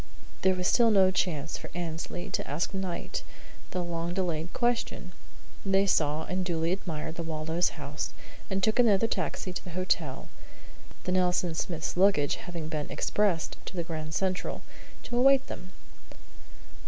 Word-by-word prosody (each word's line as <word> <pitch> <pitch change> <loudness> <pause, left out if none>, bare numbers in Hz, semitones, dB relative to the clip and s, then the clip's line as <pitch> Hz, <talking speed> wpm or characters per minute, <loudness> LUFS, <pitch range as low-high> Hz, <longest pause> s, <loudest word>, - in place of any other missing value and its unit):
There 190 0 +4
was 180 0 0
still 235 -2 +5
no 190 -3 +6
chance 160 -5 -1
for - - -8
Annesley 170 0 -4
to - - -2
ask 150 +8 -1
Knight 190 -3 -3 0.5
the 180 - -2
long 170 0 -2
delayed 170 -3 -1
question. 240 -6 0 0.5
They 195 0 +3
saw 155 -4 +2
and 185 0 -1
duly 165 -2 0
admired 160 -4 -3
the - - -2
Waldos' 160 +2 0
house, 145 0 -4 0.4
and 190 0 -1
took 220 +2 +3
another 225 -3 +5
taxi 190 -4 -2
to - - -4
the - - -8
hotel, 165 -7 0 0.8
the 180 - -1
Nelson 180 -2 +2
Smiths' 160 0 -2
luggage 180 -6 +4
having 170 -3 -5
been 155 -2 -3
"expressed" 195 -6 +1
to - - -6
the 170 - -1
Grand 155 -2 -4
Central, 185 +1 -1 0.4
to 240 - -3
await 270 +1 +6
them. 185 - -8
180 Hz, 155 wpm, -29 LUFS, 160-190 Hz, 0.8 s, no